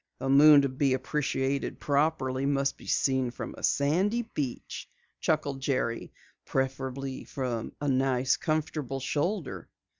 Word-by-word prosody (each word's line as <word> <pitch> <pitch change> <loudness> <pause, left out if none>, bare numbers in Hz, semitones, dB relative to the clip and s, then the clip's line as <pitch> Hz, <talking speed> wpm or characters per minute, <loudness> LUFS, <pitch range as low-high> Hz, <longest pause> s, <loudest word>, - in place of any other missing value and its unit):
"A 135 - -3
moon 145 +1 +8
to 140 - +1
be 130 0 +1
appreciated 135 0 -1
properly 140 -2 +1
must 140 -1 +1
be - - -14
seen 130 -2 +2
from 120 - -6
a - - -11
sandy 185 +12 +2
beach," 145 - -5 0.3
chuckled 145 -4 0
Jerry. 130 -4 -1 0.3
"Preferably 135 0 -3
from 125 -4 -4
a 145 - -2
nice 130 -1 +2
comfortable 150 -4 -2
shoulder." 145 - -2
135 Hz, 125 wpm, -29 LUFS, 130-145 Hz, 0.3 s, moon